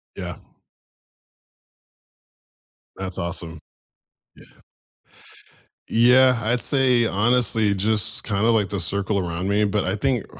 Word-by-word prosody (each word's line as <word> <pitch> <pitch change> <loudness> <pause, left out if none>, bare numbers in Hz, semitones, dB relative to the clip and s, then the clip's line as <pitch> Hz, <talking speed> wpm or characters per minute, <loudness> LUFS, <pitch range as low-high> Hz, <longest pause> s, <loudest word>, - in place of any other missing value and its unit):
Yeah. - - -6 2.6
That's 95 -2 -6
awesome. 85 -2 -5 0.8
Yeah. - - -20 1.3
Yeah, 125 +2 +4
I'd 120 +3 0
say, 130 -4 +2
honestly, 110 -1 +1
just 110 +2 -1
kinda 105 +1 0
like 110 -4 +1
the 100 - -3
circle 100 +1 -1
around 85 0 -4
me, 105 +1 +1
but 100 0 -1
I 95 +2 -2
think 125 +1 -1
105 Hz, 105 wpm, -22 LUFS, 95-120 Hz, 2.6 s, Yeah